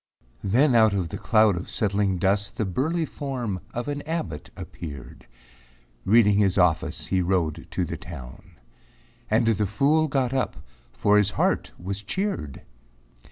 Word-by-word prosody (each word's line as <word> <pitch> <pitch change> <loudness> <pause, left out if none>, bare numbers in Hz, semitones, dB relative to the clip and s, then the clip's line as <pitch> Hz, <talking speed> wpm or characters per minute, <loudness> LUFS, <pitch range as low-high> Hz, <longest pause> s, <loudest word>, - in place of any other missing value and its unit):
Then 125 +8 +3
out 110 -3 +5
of 90 -4 -1
the - - -6
cloud 110 -3 +4
of 90 - -6
settling 100 -2 0
dust 100 +2 0
The 110 - 0
burly 155 - 0
form 125 -11 -4
of 120 +4 -4
an 145 0 -3
abbot 105 - -4
appeared, 70 -7 -9 0.8
Reading 105 -1 +5
his 100 -2 +2
office 90 -4 +1
he 95 -1 +1
rode 85 -4 -1
to - - -1
the - - -5
town. 65 -8 -10 0.8
And - - +3
the 105 -2 +2
fool 145 +10 +2
got 135 -3 0
up, 130 -7 -1 0.4
for 105 0 +3
his 105 -1 +2
heart - - +1
was 100 +3 -4
cheered. 100 - -3
105 Hz, 150 wpm, -25 LUFS, 95-125 Hz, 0.8 s, out